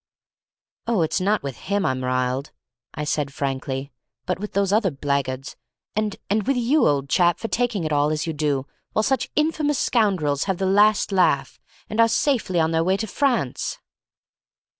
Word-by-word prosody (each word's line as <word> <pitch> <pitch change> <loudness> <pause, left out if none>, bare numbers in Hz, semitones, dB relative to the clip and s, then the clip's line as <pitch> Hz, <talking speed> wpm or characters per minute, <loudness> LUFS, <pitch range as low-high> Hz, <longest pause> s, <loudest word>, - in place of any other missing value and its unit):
"Oh, 225 -7 +2
it's 160 +4 -1
not 205 0 +1
with 135 -4 -5
him 200 -1 +1
I'm 130 0 -1
riled," 130 +2 -1 0.5
I 150 - -3
said 150 -1 -1
frankly, 135 0 -3 0.3
"but 180 0 -2
with 210 +1 -6
those 200 0 +1
other 210 -2 +3
blackguards, 135 -2 -2 0.4
and—and 210 0 -1
with 275 -1 +2
you, 255 +6 +3
old 140 -2 +1
chap, 175 +3 +3
for 225 - -4
taking 230 -5 0
it 155 -1 -1
all 145 +1 +3
as 155 0 -1
you 165 - -2
do, 145 -3 -1 0.3
while 215 - +2
such 265 +1 0
infamous 300 -2 +1
scoundrels 185 - +1
have 190 -2 -1
the 190 - -1
last 205 +2 +4
laugh, 155 -8 +2 0.3
and 215 - -4
are 230 - +6
safely 225 - +1
on 160 0 +2
their 165 0 +2
way 190 +3 +2
to 220 - -2
France!" 235 - -1
180 Hz, 175 wpm, -23 LUFS, 140-215 Hz, 0.5 s, are